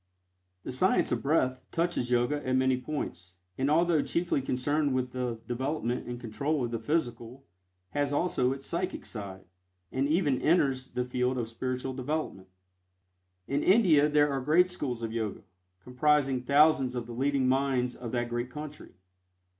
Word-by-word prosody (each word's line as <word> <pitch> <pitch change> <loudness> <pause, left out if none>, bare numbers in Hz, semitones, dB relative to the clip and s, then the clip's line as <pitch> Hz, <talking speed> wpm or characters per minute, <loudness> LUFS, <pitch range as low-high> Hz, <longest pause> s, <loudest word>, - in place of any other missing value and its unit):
The - - -5
"Science 180 +9 +2
of - - 0
Breath" 130 -3 +1
touches 170 -7 -1
Yoga 125 +4 +1
at 130 0 0
many 130 0 +3
points, 95 - -5 0.2
and 135 +6 0
although 165 0 +3
chiefly 170 -3 0
concerned 140 +2 0
with 130 -1 -1
the 125 -2 -3
development 125 0 -2
and 120 0 -5
control 135 +5 -1
of 120 - -5
the 115 - -2
physical, 125 -1 -2 0.5
has 145 -1 0
also 145 -5 +1
its 135 0 -5
psychic 185 +2 -3
side, 95 -4 -7 0.5
and 135 +2 0
even 150 -4 +1
enters 135 -5 +2
the 125 0 -2
field 125 +1 -1
of 115 -2 -2
spiritual 130 +2 -3
development. 130 -7 -3 1.0
In 140 +1 0
India 175 -8 +5
there 145 -1 +3
are 135 -1 -1
great 170 +7 +3
schools 125 -9 -3
of 115 -1 -3
Yoga, 110 -3 -3 0.4
comprising 135 0 +2
thousands 140 -1 +4
of 120 -1 -3
the 120 - -8
leading 135 +1 +1
minds 130 -2 +1
of 120 -2 -7
that 120 -1 -1
great 120 +1 -2
country. 150 +2 -9
130 Hz, 160 wpm, -29 LUFS, 125-150 Hz, 1.0 s, India